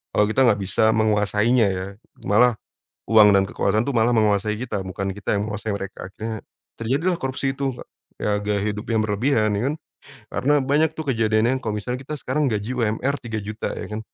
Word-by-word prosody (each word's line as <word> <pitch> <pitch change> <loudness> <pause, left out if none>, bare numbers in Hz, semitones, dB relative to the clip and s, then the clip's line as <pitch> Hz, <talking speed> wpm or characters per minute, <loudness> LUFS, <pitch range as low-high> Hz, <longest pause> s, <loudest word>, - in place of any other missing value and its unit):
Kalau 105 - +5
kita 130 +4 +3
nggak 105 -3 +3
bisa 100 +4 +3
menguasainya 105 +2 +2
ya, 95 0 -4 0.4
malah 120 +4 +4 0.5
uang 105 -2 +7
dan 95 - +4
kekuasaan 110 +4 0
tuh 140 - -2
malah 115 +2 +3
menguasai 105 -1 +2
kita, 115 -4 -3
bukan 95 +1 -3
kita 100 +1 -2
yang 100 - -1
menguasai 105 +1 -3
mereka. 100 -2 -7
Akhirnya 110 +3 -6 0.4
terjadilah 140 +11 0
korupsi 135 +1 -1
itu 135 -3 -2 0.4
he - - -3
ya, 105 0 +1
gaya 105 -1 -1
hidup 105 +1 -7
yang 110 - +2
berlebihan 110 +1 +1
ya 105 - -1
kan. - - -4 0.6
Karena 145 +3 +1
banyak 145 +4 +2
tuh 155 -3 -3
kejadiannya 115 +3 +2
kalau 110 -1 -2
misalnya 125 +4 -4
kita 150 - -5
sekarang 135 +1 0
gaji 105 +4 -2
UMR 120 +4 0
Rp3.000.000 110 -2 -4
ya - - -6
kan, - - -4
110 Hz, 185 wpm, -23 LUFS, 105-125 Hz, 0.6 s, uang